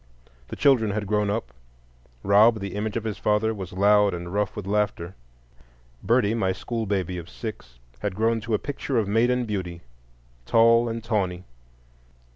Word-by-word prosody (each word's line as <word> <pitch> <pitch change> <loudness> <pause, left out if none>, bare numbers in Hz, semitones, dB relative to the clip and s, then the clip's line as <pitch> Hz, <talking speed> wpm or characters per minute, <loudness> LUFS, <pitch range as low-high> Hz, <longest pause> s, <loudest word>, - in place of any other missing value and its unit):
The - - -7
children 130 -7 +3
had 105 +1 -2
grown 105 0 0
up. 105 - -3 0.7
Rob, 110 +3 +5
the 100 -2 -5
image 105 +2 -3
of 115 - -3
his 110 -2 -4
father, 105 +1 +1
was 95 -4 -7
loud 100 +1 +3
and 85 +1 -7
rough 105 -1 -1
with 105 - -6
laughter. 100 -3 -1 0.9
Birdie, 115 -3 +2
my 95 -5 0
school 115 +4 -4
baby 95 -3 -2
of 85 - -10
six, 95 - -8 0.2
had 105 -3 -3
grown 115 +2 +1
to 110 +1 -1
a - - +2
picture 140 0 -3
of 110 -3 +1
maiden 120 +4 +2
beauty, 90 -5 -4 0.7
tall 115 +1 +4
and 115 0 -5
tawny. 95 -6 -1
105 Hz, 165 wpm, -25 LUFS, 95-115 Hz, 0.9 s, Rob